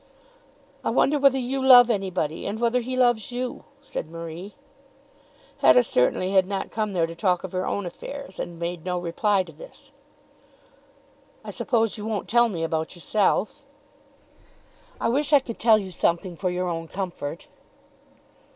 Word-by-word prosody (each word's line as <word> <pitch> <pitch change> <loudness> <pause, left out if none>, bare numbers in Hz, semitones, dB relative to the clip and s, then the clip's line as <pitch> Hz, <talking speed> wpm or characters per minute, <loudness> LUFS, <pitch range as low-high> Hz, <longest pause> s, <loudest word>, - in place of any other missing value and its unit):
"I - - 0
wonder 295 +1 +2
whether 275 -1 +4
you 260 +1 -2
love 245 -2 +8
anybody, 185 -7 -2
and 205 +2 -4
whether 235 +1 +2
he 255 +1 -4
loves 240 -2 +2
you," 250 0 -4 0.2
said 155 - -6
Marie. 165 +4 -8 1.0
Hetta 250 - +6
certainly 185 - +1
had 190 -1 +4
not 195 -1 -4
come 215 -2 -2
there 170 -3 +2
to 165 - -7
talk 180 +1 0
of 190 - -6
her 185 0 -2
own 200 - -2
affairs, 275 +4 -8
and 170 -1 -5
made 170 0 -4
no 180 0 -2
reply 185 +3 +1
to - - -13
this. - - -14 1.5
"I - - -7
suppose 225 -4 0
you 210 - -6
won't 215 -3 -3
tell 240 0 +4
me 170 -6 -4
about 160 +1 -2
yourself." 210 - 0 1.4
"I - - 0
wish 285 +5 0
I 290 - +8
could 235 -4 -8
tell 225 -1 +5
you 195 -3 -5
something 175 +1 0
for 185 +2 -2
your 180 0 -2
own 165 -1 -4
comfort." 175 -6 -5
195 Hz, 160 wpm, -24 LUFS, 175-240 Hz, 1.5 s, love